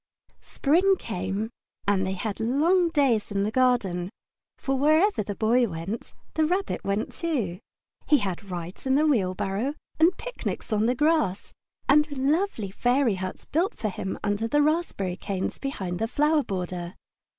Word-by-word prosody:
Spring 360 +7 +3
came, 195 - -3 0.4
and 190 -2 +2
they 190 - -1
had 205 +2 -4
long 320 +10 +3
days 275 -9 +2
in 200 -1 0
the 210 - 0
garden, 220 -8 +2 0.5
for 270 - -1
wherever 310 - +3
the 205 0 -4
Boy 235 +3 +3
went 185 +5 -6 0.2
the 315 - +2
Rabbit 370 +6 0
went 200 +2 -1
too. 240 - -2 0.5
He 295 - +6
had 195 -3 -4
rides 175 +6 -6
in 265 - +3
the 300 +2 +4
wheelbarrow, 205 0 0 0.2
and 335 +3 +5
picnics - - -5
on 215 +1 +2
the 250 - +2
grass, 300 - +1 0.3
and 300 +2 +4
lovely 275 - 0
fairy 245 +2 +2
huts 185 0 -5
built 345 +6 0
for 215 - -1
him 190 0 -4
under 205 +2 0
the 295 +5 +3
raspberry 295 - 0
canes 190 -1 -3
behind 190 -10 -3
the 225 - 0
flower 300 +5 +2
border. 180 -5 -4
230 Hz, 155 wpm, -26 LUFS, 195-300 Hz, 0.5 s, He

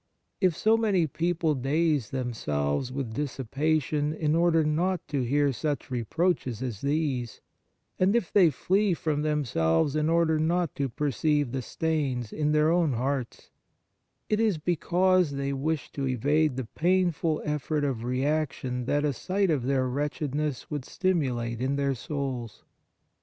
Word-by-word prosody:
If 180 -4 +2
so 220 +1 +4
many 200 -7 +2
people 165 +1 0
daze 145 -2 0
themselves 110 - -2
with 130 -4 -4
dissipation 145 +3 -1
in 155 -1 0
order 165 -1 +3
not 170 +5 0
to 140 -3 0
hear 140 +3 +2
such 145 +3 -3
reproaches 130 - -1
as 115 -6 -4
these, 140 -5 -1 0.6
and 190 +4 +3
if 220 -8 0
they 185 -5 +6
flee 190 +7 +1
from 155 -2 -1
themselves 140 - +1
in 155 +1 +1
order 165 -1 +3
not 170 0 +1
to 140 -1 0
perceive 145 +1 0
the 130 0 -2
stains 135 -6 -2
in 150 -1 0
their 155 +1 +3
own 170 -5 +2
hearts, 130 +1 -3 0.8
it 215 - +1
is 220 -6 +2
because 180 +1 +2
they 140 0 -2
wish 150 +2 -2
to 135 -1 -3
evade 145 +3 +1
the 130 -1 -3
painful 170 +1 +1
effort 150 0 -1
of 130 -5 -1
reaction 130 -1 -1
that 145 +3 +1
a 145 - +1
sight 190 +6 0
of 135 -6 0
their 130 -2 +1
wretchedness 145 +1 -2
would 145 -3 -3
stimulate 125 -11 -1
in 135 +2 0
their 140 -1 +1
souls. 130 -5 -5
150 Hz, 145 wpm, -27 LUFS, 130-160 Hz, 0.8 s, they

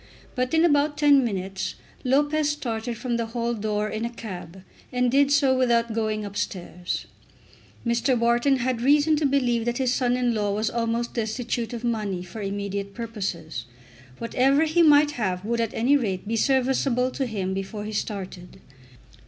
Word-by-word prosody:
But, 255 0 -1
in 320 +1 +5
about 290 -2 +2
ten 290 -2 +5
minutes, 195 -4 -3 0.3
Lopez 290 +3 +2
started 235 -5 -3
from 240 0 -2
the 230 -1 -2
hall 235 0 0
door 210 -1 -1
in 215 +1 -4
a 235 - -1
cab, 190 -6 -8 0.3
and 250 -1 +1
did 280 +1 +4
so 280 -2 +4
without 235 -3 +2
going 215 -1 -1
upstairs. 180 -3 -4 0.8
Mr. 235 +2 +2
Wharton 240 +4 +3
had 250 -1 -1
reason 295 +4 +4
to 295 -1 +2
believe 250 -4 +1
that 240 0 -1
his 255 -2 +1
son 250 -1 +1
in 245 -1 +1
law 205 -2 0
was 215 +1 0
almost 235 0 -1
destitute 230 +1 -2
of 240 -1 -6
money 210 -6 -1
for 185 +5 -8
immediate 200 0 -4
purposes. 190 - -4 0.5
Whatever 270 +5 +2
he 320 +2 +2
might 295 -2 +6
have 190 -7 -2
would 235 +1 0
at 230 -1 -1
any 250 +6 +3
rate 200 -8 -1
be 225 - -1
serviceable 260 0 +2
to 265 -1 -2
him 195 -4 -2
before 195 +2 -4
he 215 - -5
started. 190 -4 -5
235 Hz, 170 wpm, -25 LUFS, 210-260 Hz, 0.8 s, might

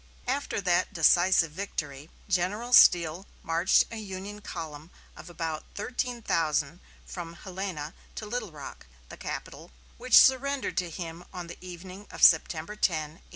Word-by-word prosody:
After 270 -1 -2
that 175 -2 +1
decisive 175 0 +4
victory, 150 -5 -6 0.2
General 205 +6 -1
Steele 175 -2 +6 0.2
marched 165 +3 +3
a 230 - -6
Union 205 0 -7
column 160 -4 -7 0.3
of - - -11
about 165 -2 -4
thirteen 245 +2 -3
thousand 160 -2 0 0.3
from 170 -2 -7
Helena 180 -5 -6 0.2
to 215 - -6
Little 215 -3 -4
Rock, 145 - -10 0.2
the - - -10
capital, - - -7 0.3
which - - +5
surrendered 270 +1 +4
to 180 -2 0
him 165 +1 -7
on 180 -1 -6
the 170 - -10
evening 185 +2 -10
of - - -6
September 160 +3 +4
10, - - -21 0.4
1863. - - -27
180 Hz, 145 wpm, -28 LUFS, 165-205 Hz, 0.4 s, Steele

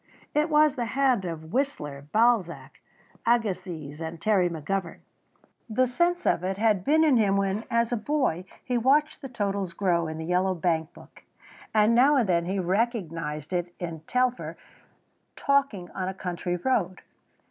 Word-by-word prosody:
It 300 +2 +2
was 300 -1 +4
the 245 -4 -2
hand 255 -8 +3
of 160 0 -6
Whistler, 150 - -2
Balzac, 220 -6 +1 0.4
Agassiz, 180 -10 -1
and 165 0 -5
Terry 185 -1 +2
McGovern. 170 +2 -4 0.7
The 255 +4 +2
sense 345 +8 0
of 170 - +2
it 190 +1 -2
had 210 -3 +2
been 315 +6 +4
in 295 -5 +4
him 200 -3 +3
when 200 +2 -1
as 235 0 +1
a 240 - +1
boy 220 - -1 0.2
he 250 -2 0
watched 290 +6 +2
the 270 - -7
totals 200 -6 -2
grow 170 -3 +1
in 155 0 -5
the 160 - -5
yellow 185 +2 +1
bankbook, 165 -2 -3 0.5
and 215 +1 +4
now 265 +5 +5
and 245 -6 +2
then 170 -2 +1
he 195 +2 -1
recognised 175 - -2
it 175 0 -2
in 170 -3 -5
Telfer 250 0 0 0.8
talking 275 -11 0
on 185 -1 -4
a 190 - -4
country 180 -1 -3
road. 185 -2 -1
195 Hz, 160 wpm, -26 LUFS, 175-245 Hz, 0.8 s, now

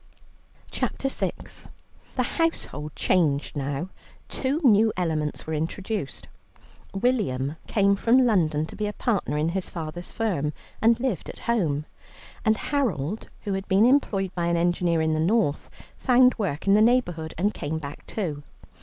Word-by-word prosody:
CHAPTER 270 - -2
VI - - 0 0.8
The - - +2
household 155 - -2
changed 150 -7 +1
now; 145 +5 -3 0.4
two 275 +3 -1
new 220 -3 +5
elements 155 -4 -1
were 160 - -4
introduced: 165 - -3 0.7
William 160 - 0
came 200 -1 +3
from 245 +6 +4
London 160 -9 +2
to - - -10
be 210 - -2
a 210 - -3
partner 205 -11 -1
in 155 +2 +1
his 185 +1 -3
father's 170 +1 -6
firm, 170 -10 -1 0.3
and 230 +1 +4
lived 240 - -2
at - - -8
home, 160 -11 +1 0.6
and 220 -1 +3
Harold, 215 - -1
who 205 - -3
had 195 0 -3
been 200 +2 +4
employed 205 -8 +2
by 170 -1 -1
an 170 0 +2
engineer 170 -1 +2
in 160 0 +1
the 155 - 0
North, 170 -3 +1 0.3
found 250 -1 +5
work 170 -8 -2
in 195 - +5
the 210 - +6
neighbourhood 175 -10 +2
and 200 +5 +1
came 150 +2 -3
back 145 -2 -7
too. 160 -9 -3
185 Hz, 155 wpm, -25 LUFS, 155-225 Hz, 0.8 s, the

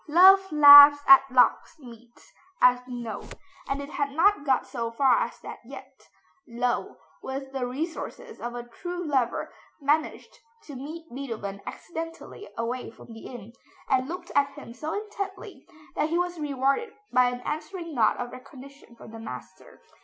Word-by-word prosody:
Love 380 +4 +6
laughs 290 -1 +9
at 270 -1 +10
locksmiths, 245 - -1 0.3
as 250 0 +5
we 250 - -7
know, 225 -3 -6 0.5
and 275 +1 -2
it 280 - -10
had 285 -1 -2
not 330 +4 +2
got 265 -3 +1
so 230 -3 -4
far 245 +1 +3
as - - -4
that - - -9
yet. - - -13 0.4
Löwe, 240 +1 -2 0.2
with 270 0 -6
the 265 -2 -3
resources 325 - -6
of 240 +1 -5
a 240 0 -7
true 355 +7 -6
lover, 265 -6 -1 0.3
managed 300 - -2 0.2
to 290 - -11
meet 310 +6 -8
Beethoven 225 -7 -6
accidentally 330 +4 -8
away 240 +2 -4
from 230 - -14
the 225 - -11
inn, 235 -3 -11 0.4
and 260 -1 +2
looked 355 0 -7
at 285 0 +3
him 280 -5 -11
so 305 +6 -6
intently 400 -1 -8 0.3
that 305 - -1
he 335 - 0
was 355 -1 -2
rewarded 280 - -1 0.2
by 250 0 +5
an 245 0 -6
answering 320 +4 -6
nod 225 -5 +2
of 245 0 -5
recognition 265 0 -14
from 225 - -14
the 225 - -10
master. 125 - -11
275 Hz, 160 wpm, -26 LUFS, 245-325 Hz, 0.5 s, at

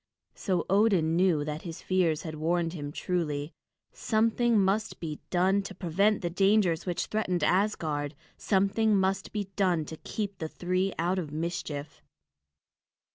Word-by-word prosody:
So 185 -4 -1
Odin 190 -5 +3
knew 170 -5 +3
that 150 +1 -4
his 165 -2 -8
fears 175 -5 +1
had 160 - -5
warned 165 +2 0
him 145 -4 -5
truly. 150 -3 -2 0.4
Something 230 0 +2
must 200 +3 0
be 155 -3 -5
done 190 +3 +3
to 195 -1 -8
prevent 195 +4 +1
the 175 - 0
dangers 195 -2 +2
which 175 - -1
threatened 185 -6 -1
Asgard. 155 -6 0 0.2
Something 205 +2 +2
must 190 0 0
be 205 -2 -4
done 180 -6 +2
to 160 - -8
keep 200 +2 -5
the 160 - -3
three 185 +3 -1
out 180 +3 0
of 155 -5 -5
mischief. 155 -2 -4
180 Hz, 145 wpm, -29 LUFS, 160-195 Hz, 0.4 s, Odin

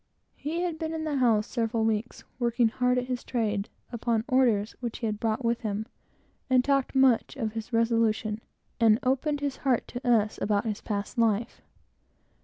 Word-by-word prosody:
He 325 +4 -3
had 340 -3 -2
been 320 -1 -3
in 315 - -3
the 300 -3 -1
house 225 -5 +3
several 230 -2 -1
weeks, 225 +1 -2 0.2
working 235 -1 +2
hard 250 +1 +1
at 250 - 0
his 250 -1 -3
trade, 215 -4 -1 0.2
upon 230 -1 -1
orders 235 -6 +2
which 235 -3 -4
he 235 - -4
had 210 -1 -2
brought 225 +2 -1
with 235 0 +1
him, 215 -1 -2 0.6
and 255 -1 +4
talked 275 -1 +1
much 265 -2 +3
of 225 -6 -3
his 225 +1 -6
resolution, 230 -2 +1 0.4
and 220 -2 +5
opened 285 +3 0
his 285 -2 -2
heart 260 -4 0
to 250 +1 -6
us 215 -3 +2
about 205 +1 +1
his 215 -2 -3
past 205 +3 -3
life. 225 0 +1
235 Hz, 180 wpm, -28 LUFS, 220-260 Hz, 0.6 s, and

